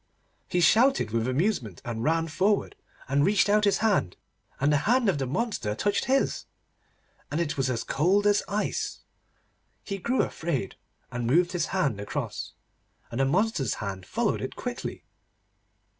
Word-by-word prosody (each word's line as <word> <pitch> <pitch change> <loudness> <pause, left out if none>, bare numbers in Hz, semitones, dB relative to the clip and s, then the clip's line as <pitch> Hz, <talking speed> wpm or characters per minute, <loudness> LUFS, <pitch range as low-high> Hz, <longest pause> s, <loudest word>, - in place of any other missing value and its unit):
He 175 - 0
shouted 225 - +4
with 115 +1 0
amusement, 130 - 0
and 115 -1 -3
ran 165 +3 +1
forward, 195 +6 +1 0.3
and 140 +1 +2
reached 200 +2 +3
out 210 +1 +4
his 200 - +3
hand, 190 - +1 0.4
and 145 +2 +3
the - - +5
hand 250 -1 +4
of 185 -7 +2
the 135 - -1
monster 135 - -2
touched 200 - 0
his, 270 +2 +1 0.8
and 150 - -2
it 165 -3 -1
was 135 -2 0
as 120 -2 -1
cold 190 +8 +2
as 205 0 +4
ice. 205 +1 -2 0.8
He 195 -1 -4
grew 250 +7 +1
afraid, 140 - -3 0.4
and 120 -1 -3
moved 175 +7 +3
his 175 -3 -1
hand 150 - 0
across, 100 - -4 0.6
and 120 - -4
the 135 - +4
monster's 170 - +1
hand 95 -3 -6
followed - - 0
it - - -5
quickly. - - -5
165 Hz, 160 wpm, -27 LUFS, 125-205 Hz, 0.8 s, the